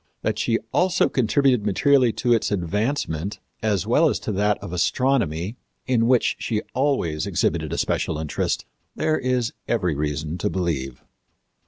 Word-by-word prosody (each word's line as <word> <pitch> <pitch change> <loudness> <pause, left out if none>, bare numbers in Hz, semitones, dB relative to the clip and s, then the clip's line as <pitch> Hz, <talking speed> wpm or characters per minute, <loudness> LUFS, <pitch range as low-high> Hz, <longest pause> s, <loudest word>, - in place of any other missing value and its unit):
That 110 0 -1
she 115 0 +2 0.2
also 180 0 +3
contributed 130 -1 +2
materially 125 +5 +3
to 120 -1 +2
its 115 - +1
advancement, 100 - -1 0.2
as 105 -3 0
well 150 +8 +4
as - - 0
to - - -3
that 105 +1 +1
of 85 - -8
astronomy, 105 - 0 0.3
in 115 -3 +2
which 125 -1 +3
she 110 -2 -2
always 125 - 0
exhibited - - 0
a - - -2
special 80 - 0
interest, 75 -1 -2 0.3
there 155 0 +1
is 125 -2 0
every 95 -8 +1
reason 75 +3 -3
to 105 - 0
believe. 75 -10 -3
105 Hz, 150 wpm, -23 LUFS, 85-125 Hz, 0.3 s, well